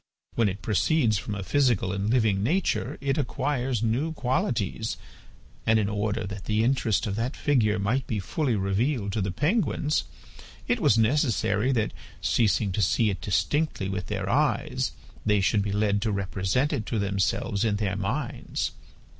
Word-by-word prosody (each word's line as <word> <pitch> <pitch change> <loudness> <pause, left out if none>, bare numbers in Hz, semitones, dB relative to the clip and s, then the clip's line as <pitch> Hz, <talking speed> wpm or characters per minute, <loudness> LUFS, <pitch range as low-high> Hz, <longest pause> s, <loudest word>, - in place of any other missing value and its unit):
When 115 -3 +2
it 100 +2 -6
proceeds 110 - +2
from 105 - -4
a 100 - -4
physical 120 -7 +2
and 100 +2 -1
living 110 -5 +2
nature 170 - 0
it 140 +2 0
acquires 130 -3 -1
new 130 +9 0
qualities, 130 - -1 0.7
and 115 0 +3
in 105 -2 +1
order 105 0 -1
that 100 0 -7
the 110 +1 +1
interest 115 -5 +1
of 100 -2 -2
that 120 +4 -2
figure 110 -7 +2
might 115 +7 0
be 110 - -1
fully 125 - -1
revealed 100 +3 0
to 110 - 0
the 95 - -1
penguins 150 - 0 0.6
it - - +1
was 110 - +4
necessary 115 -2 +2
that, 110 -3 0 0.3
ceasing 105 -2 +2
to 100 - -1
see 105 +4 +2
it 90 -5 -5
distinctly 145 - 0
with 95 -2 -3
their - - -3
eyes, - - +1 0.3
they 105 -1 +3
should 100 +2 +2
be 100 0 -2
led 100 0 +1
to 110 - 0
represent 100 +7 0
it 110 - -2
to 115 - -1
themselves 100 +1 0
in 110 -3 +1
their 100 -2 -1
minds. 120 +6 -2
110 Hz, 165 wpm, -26 LUFS, 100-130 Hz, 0.7 s, was